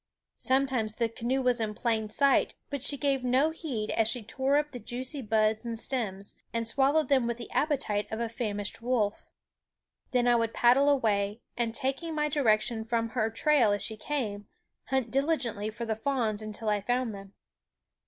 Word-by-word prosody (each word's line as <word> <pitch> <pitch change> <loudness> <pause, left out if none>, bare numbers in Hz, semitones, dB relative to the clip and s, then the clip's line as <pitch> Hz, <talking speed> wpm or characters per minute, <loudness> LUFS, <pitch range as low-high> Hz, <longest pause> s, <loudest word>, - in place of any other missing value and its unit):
Sometimes 260 -5 +1
the 230 0 0
canoe 240 +4 -1
was 250 -2 +2
in 210 -1 -2
plain 220 -2 -1
sight; 280 +5 +3 0.2
but 280 -2 -3
she 285 +2 +2
gave 275 -2 0
no 260 +5 +3
heed 260 -10 -4
as 225 - +2
she 240 0 0
tore 265 +5 +1
up 295 0 0
the 250 - -7
juicy 255 +5 -3
buds 215 -1 +1
and 230 -1 -4
stems, 210 -6 -2 0.2
and 230 0 -1
swallowed 280 +6 +3
them 265 -4 +3
with 235 -1 -2
the 235 - -9
appetite 250 -9 0
of 220 - -3
a 235 - -1
famished 215 -2 -4
wolf. 230 -4 0 0.8
Then 245 -1 +2
I 240 - +5
would 230 -1 0
paddle 255 +4 +5
away 215 -5 +1
and, 235 -1 -1
taking 285 +5 -2
my 300 0 +1
direction 225 -5 +1
from 230 0 -1
her 225 -2 0
trail 245 -1 +3
as 205 - -1
she 220 - -3
came, 215 -4 -3 0.4
hunt 260 -4 -1
diligently 260 -7 0
for 230 +2 -6
the 220 -1 -1
fawns 220 -3 -1
until 215 +1 -5
I 210 -1 +1
found 245 +1 -1
them. 195 0 -10
235 Hz, 185 wpm, -29 LUFS, 220-270 Hz, 0.8 s, I